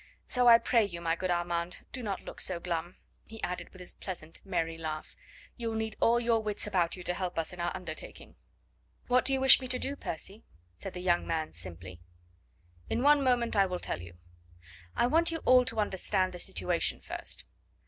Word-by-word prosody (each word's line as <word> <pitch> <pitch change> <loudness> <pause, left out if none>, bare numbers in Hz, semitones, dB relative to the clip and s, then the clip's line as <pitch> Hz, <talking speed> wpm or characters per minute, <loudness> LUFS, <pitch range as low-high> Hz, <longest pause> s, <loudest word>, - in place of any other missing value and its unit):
So 250 -1 +3
I 230 -1 +10
pray 230 0 +3
you, 175 -4 -4
my 165 -1 0
good 185 +2 -3
Armand, 175 0 -1
do 255 - -5
not 200 -5 -3
look - - -6
so 180 -2 0
glum," 175 0 -3 0.3
he 225 0 -10
added 180 0 -3
with 185 - -14
his 180 - -6
pleasant, 165 -4 -6
merry 165 -4 -1
laugh; 155 -1 -5 0.4
"you'll 230 -2 -3
need 220 -1 -2
all 235 +1 +4
your 230 -1 +2
wits 210 -1 -1
about 180 -5 +1
you 180 - -9
to 180 - +1
help 180 -1 -3
us 165 +1 -1
in 180 - -10
our 175 0 0
undertaking." 160 -3 -8 0.7
"What 250 0 +3
do - - +1
you 265 - +2
wish 265 0 +8
me 255 - -4
to 255 - +2
do, 275 +2 -2
Percy?" 200 - -5 0.3
said 90 - -7
the 180 - -4
young 175 -1 +2
man 160 -1 -2
simply. 90 0 -7 0.9
"In 245 - 0
one 290 0 +6
moment 245 -3 +2
I 195 -1 +5
will 180 -1 -2
tell 85 - -4
you. 85 0 -11 0.8
I - - +3
want 330 +6 +3
you 330 - -1
all 255 0 +6
to 220 - -1
understand 190 -2 0
the 180 - -7
situation 180 -2 0
first. - - -6
185 Hz, 205 wpm, -30 LUFS, 170-235 Hz, 0.9 s, I